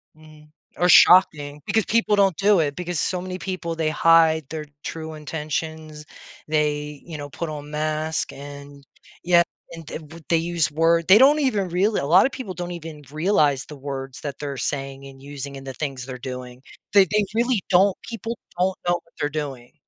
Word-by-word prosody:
Mhm. 155 -1 -18 0.3
Or 180 - +3
shocking 150 -6 +6
because 220 -2 +1
people 225 -2 +2
don't 195 -3 +3
do 200 -2 +4
it 145 -2 0
because 175 -2 -3
so 180 - -1
many 185 0 -5
people, 180 -2 -4
they 160 -1 0
hide 160 -1 +4
their 155 -1 -5 0.2
true 160 -1 -6
intentions. 155 0 -5 0.4
They, 150 -1 -1
you 165 -3 -7
know, 145 -1 -7
put 160 +5 -5
on 150 -1 -7
mask 155 +1 -2
and 140 0 -11 0.4
yeah. 175 0 +5 0.3
And 165 -1 -9
the 150 - -6
w 160 +1 -12
they 165 - +4
use 170 -1 0
word 165 +2 +2
they 200 +4 +8
don't 285 +3 +6
even 210 -10 0
really 200 +5 +1
a - - -2
lot 175 +5 +6
of 270 - 0
people 215 -9 -6
don't 175 0 -5
even 160 -3 -8
realize 155 -5 +2
the 150 - -10
words 135 -1 -6
that 145 -2 -6
they're 140 -2 -5
saying 135 0 -4
and 135 -1 -13
using 140 0 -7
and 135 0 -11
the 135 - -5
things 135 -4 -4
they're 130 -1 -6
doing. 125 0 -8 0.3
They 200 -2 +7
they 210 +4 +1
really 235 -2 +1
don't 190 +1 +4
people 230 0 -6 0.2
don't 185 +1 +1
know 175 - +4
what 165 -1 -10
they're 145 - 0
doing 140 -5 -6
155 Hz, 195 wpm, -23 LUFS, 145-180 Hz, 0.4 s, they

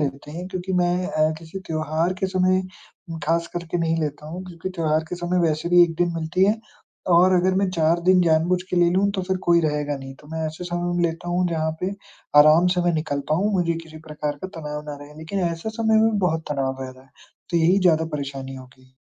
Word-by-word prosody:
लेते 140 0 -3
हैं 175 +2 -6
क्योंकि 185 0 -4
मैं 180 0 +1
अ, 155 -4 +1
किसी 165 +4 -8
त्योहार 160 +2 -1
के 190 - +1
समय 185 0 +2 0.5
उम, 165 - -5
ख़ासकर 170 +1 -1
के 175 - +1
नहीं 165 0 +1
लेता 150 -1 -4
हूँ, 175 +4 -6
क्योंकि 175 +1 -6
त्योहार 155 -1 +1
के 180 - -3
समय 175 +1 -1
वैसे 155 +2 -2
भी 175 0 +7
1 165 - -4
दिन 175 -1 +1
मिलती 165 +3 +1
है। 210 +3 +2 0.6
और 185 +2 +6
अगर 185 +1 +3
मैं 195 -1 +2
4 165 0 +2
दिन 185 -1 +6
जानबूझ 170 +2 +2
के 180 - -1
ले 175 0 +4
लूँ, 195 +3 +2
तो 190 -2 -2
फिर 190 +1 -1
कोई 170 0 +6
रहेगा 150 -1 -1
नहीं, 135 0 -9
तो 150 - -18
मैं 160 0 -3
ऐसे 160 +3 -6
समय 175 0 -2
में 175 - +1
लेता 170 +1 -3
हूँ 180 +1 +1
जहाँ 160 -1 -1
पे 185 +1 -1 0.5
आराम 155 +4 +6
से 180 - +2
मैं 175 -1 +2
निकल 155 -3 -2
पाऊँ, 200 +7 +2
मुझे 170 -2 +1
किसी 155 -1 -12
प्रकार 150 -1 -3
का 190 - -3
तनाव 150 0 -5
ना 145 - -6
रहे 150 +1 -15
लेकिन 175 +5 -4
ऐसे 165 +7 -5
समय 220 -1 +2
में 225 - +4
भी 205 - 0
बहुत 160 -1 -1
तनाव 135 -2 -2
रह 130 - -6
रहा 130 +1 -16
है। - - -27 0.4
तो 170 - +1
यही 170 +4 +4
ज़्यादा 160 -3 +3
परेशानी 135 -1 -6
हो 130 -1 -10
गई। 130 0 -23
170 Hz, 240 wpm, -23 LUFS, 155-180 Hz, 0.6 s, भी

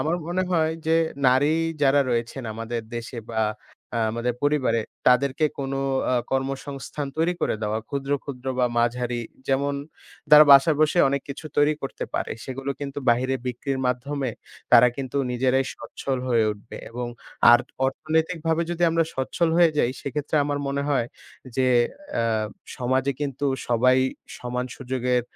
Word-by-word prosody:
আমার 160 +3 0
মনে 175 +2 0
হয় 160 -2 +2
যে, 160 - +4 0.3
নারী 130 +4 +4 0.3
যারা 140 +1 +5
রয়েছেন 120 +3 -2
আমাদের 115 +1 -4 0.2
দেশে 120 +1 -6
বা 115 - -7 0.6
আ - - +1
আমাদের 120 +1 -2
পরিবারে, 145 -6 +2 0.3
তাদেরকে 135 +4 +3
কোনো 135 0 -2 0.3
আ - - +3 0.2
কর্মসংস্থান 135 +2 -3
তৈরি 165 +3 +1
করে 155 - 0
দেওয়া। 105 +1 0
ক্ষুদ্র, 140 -1 -4
ক্ষুদ্র 130 -2 -8
বা 125 - +4
মাঝারি, 120 0 0 0.3
যেমন 140 +1 +1 0.6
তারা 150 0 +10
বাসায় 140 +3 +6
বসে 155 +3 +3
অনেক 140 0 -1
কিছু 140 +3 -7
তৈরি 145 +1 +4
করতে 135 - -4
পারে। - - -1
সেগুলো 135 +1 -4
কিন্তু 140 0 -4
বাহিরে 130 +3 +1
বিক্রির 130 +2 -2
মাধ্যমে 130 +2 -2 0.4
তারা 125 - +8
কিন্তু 135 -1 -5
নিজেরাই 130 +2 +1
স্বচ্ছল 135 -2 -4
হয়ে 115 -3 +3
উঠবে 105 +1 -12
এবং 120 +1 -4 0.4
আর 120 - +8 0.3
অর্থনৈতিকভাবে 160 +3 0
যদি 175 0 -2
আমরা 165 0 +2
সচ্ছল 150 +5 0
হয়ে 170 -1 +6
যাই, 120 - +3
সেক্ষেত্রে 145 +2 -2
আমার 145 0 -1
মনে 140 0 -1
হয় 135 -5 +1 0.5
যে 130 -1 +3 0.5
অ্যা 115 - +1 0.5
সমাজে 130 +2 +1
কিন্তু 140 -1 -2 0.2
সবাই 125 +2 +4 0.4
সমান 125 0 -3
সুযোগের 125 -1 0
135 Hz, 150 wpm, -24 LUFS, 125-145 Hz, 0.6 s, তারা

